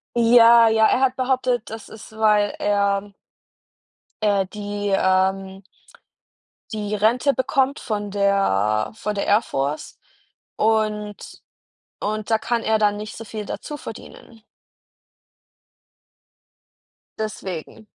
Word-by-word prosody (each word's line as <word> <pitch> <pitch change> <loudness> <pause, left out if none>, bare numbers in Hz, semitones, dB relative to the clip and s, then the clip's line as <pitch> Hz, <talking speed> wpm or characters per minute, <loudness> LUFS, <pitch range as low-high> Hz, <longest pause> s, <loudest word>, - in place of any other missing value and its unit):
Ja, 235 0 +7
ja, 220 0 +4
er - - +2
hat 260 -1 +2
behauptet, 255 -2 0
dass 225 -1 -8
es, 220 -1 -12
weil 210 -2 +2
er 200 0 0 1.1
äh, 200 -2 +2
die, 205 -1 -4
ähm 190 +1 0 1.1
die 210 -1 -3
Rente 235 +7 +2
bekommt 270 +1 0
von 205 -2 -3
der 190 - +1
von 210 -1 -4
der 200 - -2
Air 205 +2 +4
Force 140 - -4 0.6
und 215 -1 0 0.9
und 215 +1 -3
da 225 - +3
kann 235 +1 -1
er 220 0 +2
dann 205 -1 +2
nicht 210 +1 -7
so 225 - -8
viel 215 -1 -7
dazu 295 - -6
verdienen. 225 -2 -11 2.8
Deswegen. 195 -3 -6
210 Hz, 110 wpm, -22 LUFS, 200-225 Hz, 2.8 s, Ja